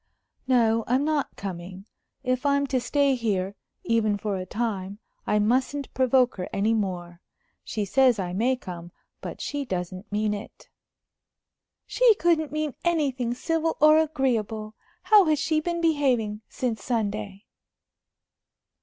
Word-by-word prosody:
"No, 230 -3 +3
I'm 260 +4 +2
not 305 -2 -1
coming. 185 0 -7 0.4
If 255 0 0
I'm 280 0 +2
to 265 -2 0
stay 280 +2 +2
here, 200 -6 -1 0.3
even 215 -3 +1
for 205 -1 -2
a 185 -1 -5
time, 200 -3 -3 0.3
I 210 - +2
mustn't 260 +6 0
provoke 255 -2 +3
her 180 - -4
any 205 +3 +1
more. 180 -5 -3 0.4
She 210 -2 -3
says 255 +3 +4
I 180 -3 -3
may 240 +7 +2
come, 175 -7 -9 0.3
but - - -7
she 290 -1 -3
doesn't 185 -2 -5
mean 210 0 0
it." 205 0 -9 1.2
"She 485 -3 +4
couldn't 330 -5 +1
mean 305 -2 -2
anything 270 -8 0
civil 325 +4 -1
or 305 +1 +7
agreeable. 230 -8 -1 0.3
How 420 -3 +6
has 310 -2 +2
she 310 +2 +1
been 340 +1 -2
behaving 255 -10 +1
since 230 -5 -3
Sunday?" 210 -3 -3
235 Hz, 135 wpm, -26 LUFS, 205-285 Hz, 1.2 s, or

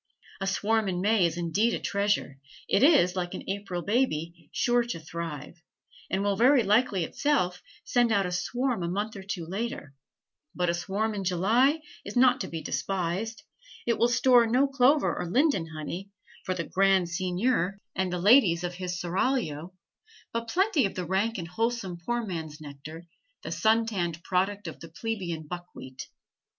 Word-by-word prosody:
A 195 - -2
swarm 210 +2 +1
in 180 -1 -2
May 205 -2 +3
is 170 0 -5
indeed 190 +7 +1
a - - -4
treasure; 200 -9 -1 0.3
it - - +2
is, 275 - +5
like 175 -1 -3
an - - -8
April 195 -3 -3
baby, 175 -8 -1
sure 240 0 +2
to 235 -7 -4
thrive, 165 0 -7 0.5
and 190 +1 0
will 200 -1 +1
very 250 +3 +5
likely 205 -2 +2
itself 180 - 0 0.2
send 240 -3 +2
out 200 -3 +3
a 180 - -3
swarm 245 +5 -1
a 170 - -1
month 205 +4 -2
or 195 - -7
two 190 -3 -5
later; 190 -5 -4 0.6
but 180 -1 +1
a - - -2
swarm 200 +5 -1
in 200 -2 -3
July 225 - +3 0.2
is - - -8
not 250 +1 +5
to - - -3
be 165 -1 -6
despised; 195 +4 -2 0.4
it 235 -1 +1
will 235 - +5
store 240 0 +5
no 250 +5 +3
clover 275 +2 +3
or - - -3
linden 250 - +2
honey 160 +5 -6 0.4
for 185 - -1
the 170 - -2
"grand 195 -1 +3
seignior 185 +2 0 0.2
and 190 -1 -1
the 180 - -1
ladies 185 -3 +5
of 175 0 -3
his 180 -1 -4
seraglio," 175 - -1 0.6
but 230 0 -2
plenty 370 - +2
of - - -10
the 180 - -3
rank 200 +6 0
and 170 -3 -5
wholesome 225 0 -2
poor 240 +4 -1
man's 160 -6 -5
nectar, 155 +3 -10 0.4
the - - -5
sun 225 +1 +3
tanned 175 -6 -3
product 195 +1 -1
of 160 - -7
the 165 - -10
plebeian 170 -3 -4
buckwheat. 150 -6 -8
195 Hz, 175 wpm, -28 LUFS, 175-230 Hz, 0.6 s, is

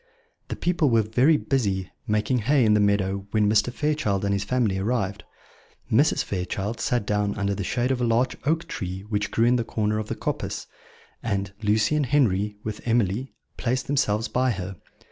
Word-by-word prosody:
The - - -4
people 170 -4 +1
were 115 -2 +4
very 125 +9 +3
busy 100 -11 -1 0.2
making 105 +4 +1
hay 130 +3 +3
in 105 - +4
the 105 - +4
meadow 100 -1 +1
when 105 -1 +2
Mr. 105 +3 +3
Fairchild 115 -6 0
and 100 - +1
his 100 0 0
family 105 -4 0
arrived. 100 -2 -1 0.7
Mrs. - - +3
Fairchild 95 +4 -3
sat 120 -4 0
down 105 -1 0
under 100 -1 0
the 100 0 -3
shade 125 +6 0
of 130 -2 -1
a - - +1
large 120 +2 +2
oak 160 +3 0
tree 95 -2 -5
which 105 -2 -1
grew 115 - +2
in 125 +1 +4
the 120 - 0
corner 105 -1 -1
of 110 - -4
the - - -3
coppice, - - -3 0.6
and 100 -3 -2
Lucy 110 +7 +2
and 145 -3 +1
Henry, 105 -7 +2
with 110 -1 -5
Emily, 115 +1 0 0.2
placed 130 +1 -1
themselves 115 -6 +1
by 130 +1 +1
her. 95 -4 -4
110 Hz, 185 wpm, -25 LUFS, 100-125 Hz, 0.7 s, were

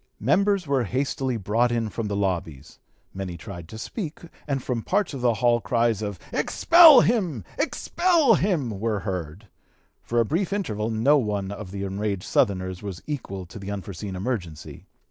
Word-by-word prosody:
Members 200 -2 +2
were 135 -4 +1
hastily 130 +1 -1
brought 115 +4 +1
in 115 -2 0
from 110 +1 -4
the 100 - -2
lobbies; 85 -7 -3 0.3
many 95 -2 -5
tried 85 -3 -9
to 110 - -9
speak, 160 - -6 0.3
and 135 -3 -1
from 120 -3 -2
parts 195 - 0
of 135 - -5
the 120 -2 +2
hall 120 0 +2
cries 115 -2 +1
of 100 -3 -4 0.2
"Expel 330 -6 +7
him! 180 - 0 0.2
Expel 330 -2 +2
him!" 150 - 0
were 110 -2 -1
heard. 90 0 -5 0.5
For 120 - -1
a 115 - +3
brief 175 - -1
interval 110 - -2
no 120 +7 +3
one 100 -4 -2
of 100 -1 -7
the 100 +1 -5
enraged 100 0 -3
Southerners 95 -2 0
was 100 -4 -7
equal 100 -11 -5
to 90 - -11
the 95 0 -7
unforeseen 100 0 -6
emergency. 90 -7 -5
110 Hz, 165 wpm, -25 LUFS, 95-140 Hz, 0.5 s, Expel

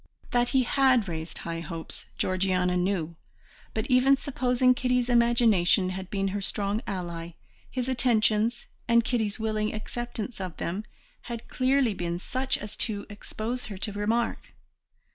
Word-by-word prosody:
That 245 0 +2
he 265 -2 +3
had 255 -3 +3
raised 160 -1 -5
high 165 0 -4
hopes, 165 0 -7
Georgiana 185 -1 +1
knew, 180 -3 -1 0.6
but 220 - 0
even 255 +1 +5
supposing 255 -2 +2
Kitty's 250 0 +1
imagination 225 -6 +4
had 190 0 -6
been 195 -1 0
her 200 +1 -3
strong 200 +2 -1
ally, 170 -3 -4 0.4
his 255 -1 -3
attentions, 235 -2 +2 0.2
and 235 0 +5
Kitty's 225 -2 -1
willing 215 -1 0
acceptance 235 0 -5
of 180 -4 -5
them, 190 +6 -3 0.4
had 235 -1 -7
clearly 260 -3 +2
been 175 -2 -2
such 260 +8 -1
as 210 0 -7
to 205 -3 -1
expose 220 +4 -4
her 205 -3 -7
to 205 +2 -4
remark. 220 +3 -1
215 Hz, 145 wpm, -27 LUFS, 185-245 Hz, 0.6 s, even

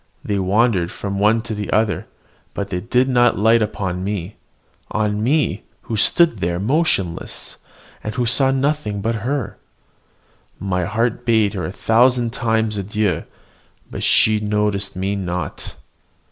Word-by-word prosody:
They 100 -1 0
wandered 95 -2 +2
from 100 -1 -4
one 110 +2 +3
to 115 - -5
the 105 -1 -4
other; 110 -5 +1 0.5
but 100 -1 -3
they 90 - -1
did 125 +6 +1
not 120 -4 +3
light 110 +3 +4
on 95 -4 -2
me, 100 -1 -4 0.5
on 105 -1 -1
me, 130 - +1 0.2
who 115 - -4
stood 135 - +3
there 85 0 -1
motionless, 105 - -1 0.5
and 110 +2 -4
who 125 -1 0
saw 130 +3 +3
nothing 135 -6 0
but 115 +2 -1
her! 135 +4 -3 1.0
My 90 -2 -1
heart 115 +4 -1
bade 110 -4 +2
her 95 -3 -3
a - - -5
thousand 120 +3 +2
times 110 -2 0
adieu, 100 -3 -1 0.7
but - - -5
she 110 -1 +4
noticed 105 -2 -1
me 95 +2 -1
not. 90 -4 -4
105 Hz, 145 wpm, -20 LUFS, 100-115 Hz, 1.0 s, light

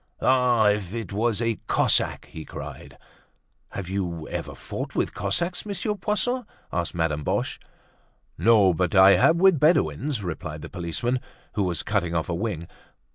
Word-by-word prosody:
"Ah! 125 -4 +4
if 105 -1 -1
it 115 -3 -5
was 115 +2 0
a 115 -1 -1
Cossack!" - - +2
he 80 - -9
cried. - - -9 0.7
"Have 100 -3 -6
you 85 -4 -3
ever - - -5
fought - - -6
with - - 0
Cossacks, 170 - -1
Monsieur 205 +1 -2
Poisson?" 210 +6 -1 0.3
asked 85 -1 -2
Madame 80 -3 -1
Boche. - - -1 0.8
"No, 105 -5 +5
but 90 +4 -1
I 95 +1 +8
have 160 - +5
with 185 -2 +4
Bedouins," 140 - +2
replied 80 -3 -5
the - - -7
policeman, 90 +9 -2 0.3
who 105 - -1
was 90 -5 -1
cutting 90 -5 -1
off 80 +1 -1
a - - 0
wing. 85 -3 -3
100 Hz, 155 wpm, -25 LUFS, 85-130 Hz, 0.8 s, I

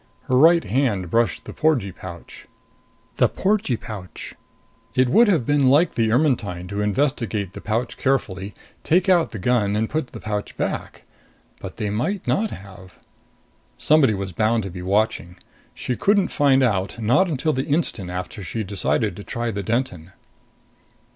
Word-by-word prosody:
Her 130 - 0
right 165 +5 +6
hand 105 -6 0
brushed 115 -5 +1
the - - -8
porgee 140 -11 +1
pouch. 85 -1 -11 0.7
The - - +4
porgee 195 - 0
pouch. 100 -6 -8 0.6
It 130 -1 +3
would 230 - +5
have 165 - +2
been 145 -1 +3
like 150 +6 +4
the 110 -1 +1
Ermetyne 115 - 0
to 100 +1 -2
investigate 105 -4 -1
the - - -8
pouch 115 +3 -2
carefully, 105 -7 -1 0.3
take 180 +3 +2
out 180 -3 +4
the 110 - -7
gun 105 0 +1
and 110 +1 -1
put 155 -3 -1
the - - -10
pouch 105 -1 -4
back. - - -4 0.6
But - - -8
they 105 -1 -2
might 150 - -2
not 220 +2 +1
have. 95 - -12 0.8
Somebody 145 -8 +4
was 95 -1 -4
bound 110 +4 +1
to 95 - -6
be 90 0 -7
watching. 95 -2 0 0.4
She 125 - -3
couldn't 200 - +2
find 135 -2 +3
out 100 -2 0
not 125 - +3
until 155 +1 0
the 130 +1 -1
instant 140 - 0
after 90 +4 -5
she 110 +4 -4
decided 100 +1 -1
to 100 - -8
try 120 +2 -3
the 100 -1 -3
Denton. 95 -6 -3
115 Hz, 160 wpm, -22 LUFS, 100-140 Hz, 0.8 s, right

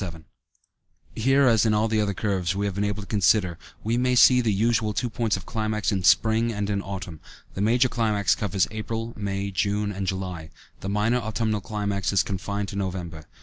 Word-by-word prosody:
77 85 -4 -7 0.9
Here, 135 +4 +3
as 115 -4 +4
in 110 -2 +2
all 110 +1 +2
the 110 -1 +1
other 100 -2 -1
curves 95 -3 -1
we 100 +1 -1
have 100 - -2
been 100 +2 -2
able 105 0 -2
to - - -13
consider, 100 -4 +2 0.2
we 115 +2 0
may 125 0 +2
see 125 +1 +7
the 115 -3 +1
usual 110 +1 +1
two 120 +2 -2
points 110 -2 0
of 95 - -10
climax 110 -1 -1
in 95 -2 0
spring 110 +6 +3
and 105 -1 -2
in 100 -1 -1
autumn; 95 -5 -7 0.3
the 95 - -4
major 120 +4 +3
climax 105 -7 +1
covers 100 -2 0
April, 115 +1 -4
May, 100 -1 -3
June, 100 +2 0
and 95 -1 -4
July, 90 -4 -4 0.3
the 95 - -5
minor 105 +4 +1
autumnal 110 -1 -2
climax 100 -1 -2
is 95 -4 +3
confined 100 +1 -3
to - - -7
November. 90 -5 -4
105 Hz, 200 wpm, -25 LUFS, 95-110 Hz, 0.9 s, see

